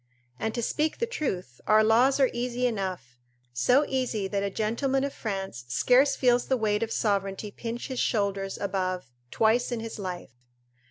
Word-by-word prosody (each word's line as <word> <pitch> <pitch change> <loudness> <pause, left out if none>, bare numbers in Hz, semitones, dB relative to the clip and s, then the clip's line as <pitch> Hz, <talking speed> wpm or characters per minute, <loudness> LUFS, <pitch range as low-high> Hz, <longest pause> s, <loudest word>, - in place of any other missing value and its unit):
And, 220 - -2
to 235 - -2
speak 305 +6 0
the 470 - 0
truth, 195 - -4
our 215 0 +6
laws 245 +6 +4
are 265 - +4
easy 245 +1 -1
enough, 185 - -3 0.3
so 250 - +3
easy 245 -7 -1
that 200 0 -1
a 200 - -1
gentleman 235 +7 0
of 280 0 -2
France 195 - -4
scarce 255 - +4
feels 245 -1 +2
the 260 - +2
weight 210 -2 0
of 225 -1 -2
sovereignty 200 -1 -1
pinch 235 +3 -5
his 260 -2 -4
shoulders 200 -3 0
above 185 -7 -2 0.2
twice 230 - +2
in 240 - -1
his 225 -1 -6
life. 180 - -5
220 Hz, 170 wpm, -27 LUFS, 195-250 Hz, 0.3 s, our